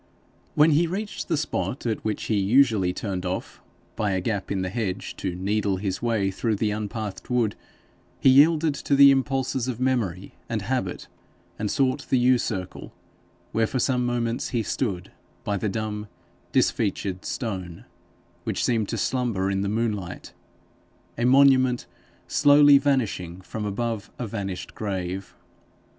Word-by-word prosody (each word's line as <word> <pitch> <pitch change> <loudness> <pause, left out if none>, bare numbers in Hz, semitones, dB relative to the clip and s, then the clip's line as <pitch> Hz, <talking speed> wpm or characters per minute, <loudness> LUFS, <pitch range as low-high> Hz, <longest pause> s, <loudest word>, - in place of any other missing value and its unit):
When 155 +2 +6
he 165 +3 +3
reached 205 +5 -4
the 165 - +1
spot 140 -3 -3
at 110 -2 -2
which 110 -1 -2
he 105 -2 0
usually 105 -3 +3
turned 95 -1 -4
off 90 0 -4 0.3
by 105 -2 0
a 95 - +1
gap 100 +1 -3
in 95 -2 0
the 90 - -2
hedge 100 -4 -3
to 90 -2 -3
NEEDLE 100 +1 0
his 95 0 -3
way 110 -5 +1
through 110 +3 -1
the 105 +1 0
unpathed 105 -1 -5
wood, 120 -4 +1 0.6
he 135 - +6
yielded 155 +3 +5
to 140 0 0
the 140 0 +9
impulses 135 -2 0
of 125 -2 -3
memory 110 -8 -1 0.2
and 110 -4 -2
habit, 105 -5 -2 0.5
and 105 -1 -1
sought 135 +3 0
the 130 - +3
yew 125 0 +4
circle, 95 -7 -4 0.6
where 115 0 +1
for 130 - -3
some 125 0 +1
moments 120 0 -1
he 120 -4 -1
stood 100 -6 -3 0.3
by 105 - -1
the 105 +2 -1
dumb, 105 0 -4 0.4
disfeatured 95 -1 0
stone, 95 -8 -5 0.6
which - - -1
seemed 115 -4 +1
to 115 - -2
slumber 110 -4 0
in 95 0 0
the 100 - -1
moonlight, 105 -5 -3 0.8
a 120 - -1
monument 130 -1 +5 0.4
slowly 145 -1 +6
vanishing 115 -11 -1
from 105 +3 -5
above 110 +1 -3
a 125 - -3
vanished 100 -4 -5
grave. 95 -2 -4
110 Hz, 150 wpm, -25 LUFS, 100-130 Hz, 0.8 s, the